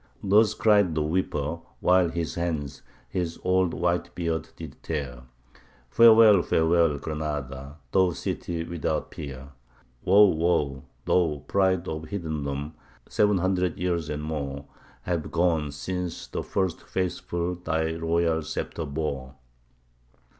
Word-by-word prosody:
Thus 105 +2 +4
cried 100 -7 +3
the 75 - +1
weeper, 80 -1 -1 0.2
while 90 -1 +4
his 85 -1 -3
hands 80 -5 -3 0.3
his 85 +6 -3
old 90 -1 +2
white 85 0 -1
beard 85 -2 -2
did - - -10
tear, 65 -6 -5 0.7
Farewell, 110 -4 +7
farewell, 80 -2 +2
Granada! 75 -2 -5
thou 95 -1 +4
city 85 0 -4
without 85 -2 -3
peer! 70 -1 -8 0.5
Woe, 100 +3 +7
woe, 80 -7 +1 0.2
thou 80 -5 +1
pride 95 -2 +1
of 80 0 -4
heathendom! 75 -5 -4 0.3
seven 105 -1 +2
hundred 90 -1 0
years 85 -3 -1
and 75 0 -4
more 70 -2 -4 0.4
Have 85 -4 -2
gone 80 -4 +1
since 90 +4 -4
first 95 -3 -2
the - - -20
faithful 90 -1 -2
thy 80 -2 -1
royal 80 0 +1
sceptre 80 +1 -4
bore! 70 -3 -4
85 Hz, 120 wpm, -26 LUFS, 75-90 Hz, 0.7 s, Farewell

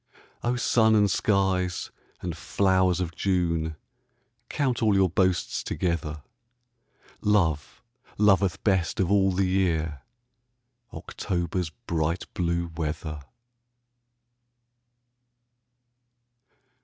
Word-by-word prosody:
O 120 +1 +1
sun 110 -2 +3
and 105 -2 +4
skies 95 -3 0 0.3
and 90 -2 -4
flowers 95 -1 +1
of 85 -2 -3
June, 85 -4 0 0.7
Count 130 -5 -1
all 110 -3 +3
your 95 -3 +3
boasts 90 0 +1
together, 80 -4 -3 1.0
Love 85 -8 0 0.3
loveth 100 -3 +3
best 95 -5 +1
of 95 -1 +1
all 95 -1 +4
the 95 +1 +1
year 80 -6 0 0.9
October's 90 -2 -3 0.2
bright 85 +1 -1
blue 85 -1 -1
weather. 75 -1 -4
90 Hz, 85 wpm, -26 LUFS, 85-100 Hz, 1.0 s, and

